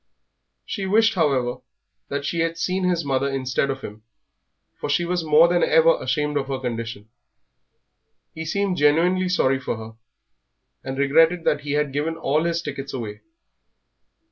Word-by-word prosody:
She 195 -3 -4
wished, 225 +3 +4
however, 135 - +1 0.5
that 140 0 -4
she 170 - -2
had 165 0 0
seen 185 +2 -1
his 175 -3 0
mother 135 0 0
instead 135 0 -1
of 135 0 -3
him, 105 -2 -9 0.8
for - - -4
she 170 +4 +1
was 175 0 -1
more 155 +2 +6
than 175 0 +1
ever - - +4
ashamed 150 -1 -1
of 140 - -2
her 135 -1 -2
condition. 115 -4 -5 1.3
He 160 - -6
seemed 195 +2 -1
genuinely 175 +5 +3
sorry 135 -7 +2
for 125 - -3
her, 110 0 -9 0.9
and 135 0 -5
regretted 165 +5 +3
that 145 -3 +1
he 145 0 -4
had 145 -2 0
given 155 +3 -2
all 155 +4 0
his 170 0 -1
tickets 140 -2 -6
away. 110 -4 -6
150 Hz, 160 wpm, -23 LUFS, 135-175 Hz, 1.3 s, more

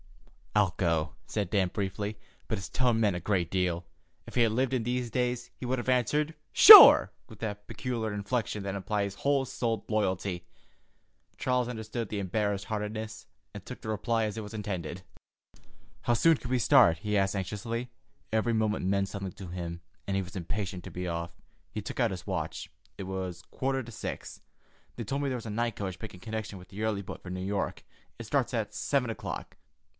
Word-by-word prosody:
"I'll 100 -4 +3
go," 80 -3 +1
said 105 -4 -2
Dan 95 -4 +2
briefly, 100 +2 -3 0.3
but 110 - 0
his 95 - -5
tone 125 -3 +2
meant 105 -5 +2
a - - -2
great 90 -3 0
deal. 90 -2 0 0.4
If - - -10
he 125 - +3
had 115 -2 +4
lived 130 +3 0
in 125 -3 +1
these 125 +1 -1
days, 125 0 -1
he - - -7
would 130 +1 0
have 120 - -5
answered 145 +5 +2 0.2
"Sure!" - - +11 0.2
with 110 - -13
that 105 -2 -5
peculiar 115 -4 -3
inflection 105 0 -2
that 100 -1 -3
implies 100 0 -1
whole 140 +3 +1
souled 115 -4 -2
loyalty. 95 -4 -1 0.9
Charles 125 -1 0
understood 110 -1 -4
the 105 - -3
embarrassed 100 +1 -1
heartiness, 110 0 -4 0.3
and - - -8
took - - -8
the 110 - -6
reply 110 +1 0
as 105 0 -4
it - - -2
was 105 +1 -8
intended. 95 -4 -4 1.0
"How 120 - +2
soon 165 +8 +5
can 125 - -8
we 130 -1 +2
start?" 85 -7 +6
he 105 +5 -2
asked 95 0 +2
anxiously. 115 +5 -3 0.4
Every 110 +1 +2
moment 110 -3 0
meant 100 0 +1
something 100 -2 -5
to 95 - -9
him, 85 -1 -5 0.3
and 100 - -1
he 95 - 0
was 90 +3 -11
impatient 95 0 -4
to - - -8
be 90 0 -4
off. 85 0 -3 0.4
He 105 - -4
took 105 - -7
out 120 -4 +3
his 90 0 -7
watch. 85 -5 -3 0.3
It - - -5
was 95 -2 -5
quarter 135 -1 -1
to 120 - -10
six. - - -6 0.5
"They 120 - -4
told 135 +6 -2
me 140 - 0
there 130 - -1
was 115 - -9
a - - -5
night 115 0 -1
coach 95 -3 -5
making 110 -5 -8
connection 110 -2 -5
with 90 - -13
the 105 +2 -6
early 105 -2 -1
boat - - -8
for 90 - -9
New 90 0 -4
York. 100 0 -2 0.3
It - - -6
starts - - 0
at - - -2
seven 135 -4 0
o'clock. - - -6
105 Hz, 200 wpm, -29 LUFS, 95-115 Hz, 1.0 s, Sure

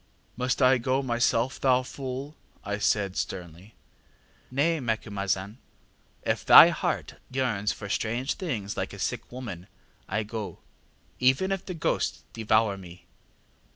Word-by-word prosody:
ŌĆ£ŌĆśMust 125 +2 0
I 130 +1 +6
go 130 +3 0
myself, 120 0 +1
thou 130 -1 +4
fool? 135 +3 -6 0.3
ŌĆÖ - - -7
I 105 - 0
said, 100 -2 +1
sternly. 90 +3 -6 0.8
ŌĆ£ŌĆśNay, 150 +4 +1
Macumazahn, 100 -2 -2 0.7
if - - 0
thy - - +10
heart - - -2
yearns 120 -6 0
for 105 - -7
strange 120 +7 -1
things 110 - -4
like - - -3
a - - -8
sick - - -3
woman, 110 -9 -7 0.4
I 110 +3 0
go, 105 -1 -6 0.6
even 130 +10 +3
if 195 -1 -1
the 180 - -4
ghosts 160 - -1
devour 110 -2 +2
me. 90 -1 -13
115 Hz, 135 wpm, -27 LUFS, 100-130 Hz, 0.8 s, thy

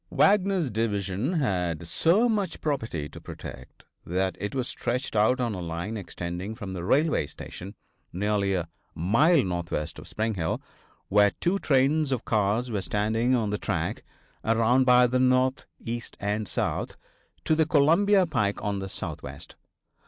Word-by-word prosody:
Wagner's 195 - +3
division 105 - -1
had 90 - -1
so 175 - +3
much 205 -7 -1
property 110 - -2
to - - -12
protect 65 0 -10 0.2
that 95 +2 -1
it 105 +5 -4
was 130 -2 -1
stretched 125 0 -2
out 110 +5 +3
on 120 -3 0
a 95 - -5
line 85 +6 -4
extending 90 0 -5
from 100 -5 -6
the 90 -2 -5
railway 145 - +2
station, 95 +7 -9 0.4
nearly 100 +1 0
a 85 -2 -2 0.3
mile 135 - +4
northwest 85 -4 -3
of - - -11
Spring 110 +1 -1
Hill, 80 -5 -1 0.5
where 105 0 +5
two 190 +3 +1
trains 140 +1 +2
of 130 -4 -1
cars 110 +3 +1
were 105 -3 -1
standing 110 +6 +1
on 110 -4 0
the 105 - -2
track, - - -2 0.4
around 115 +3 +3
by 125 0 +6
the 125 +1 +1
north, 130 0 +2
east 120 +1 -5
and 105 +1 -2
south, - - -2 0.5
to - - +3
the 160 0 +3
Columbia 175 +7 +4
pike 105 -11 0
on 100 -2 -1
the 95 0 -5
southwest. - - -7
110 Hz, 155 wpm, -27 LUFS, 95-135 Hz, 0.5 s, by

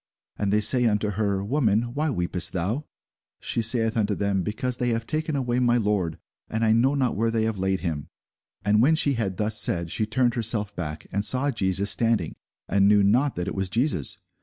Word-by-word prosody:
And 100 -1 -2
they 105 +1 +2
say 125 +4 +3
unto 105 -2 0
her, 100 -1 -2
Woman, 120 -2 0
why 150 +3 -1
weepest 90 - +1
thou? 105 - -3 0.5
She 115 - 0
saith 115 0 +3
unto 105 -2 0
them, 100 -1 -1
Because 120 +6 -3
they 125 - -1
have 115 -1 -2
taken 155 +2 -2
away 125 -2 -1
my 120 -1 +2
Lord, 100 -7 -1 0.3
and 110 +1 -1
I 110 - +3
know 125 +5 +2
not 130 -3 0
where 115 +2 0
they 115 -1 -1
have 110 -3 -2
laid 95 0 -1
him. 80 -3 -4 0.6
And 105 +1 +3
when 155 +6 +4
she 145 -3 +2
had 100 -7 -3
thus 105 0 +1
said, 85 -1 +2
she 110 - -1
turned 120 +2 +1
herself 110 -3 0
back, 80 -3 -6
and 100 +1 -1
saw 130 +5 +3
Jesus 100 -3 +1
standing, 115 -8 +1 0.3
and 100 +1 +2
knew 105 0 +4
not 125 +8 +2
that 90 +1 -4
it - - -3
was 95 -1 -3
Jesus. 115 - 0
110 Hz, 210 wpm, -24 LUFS, 100-120 Hz, 0.6 s, when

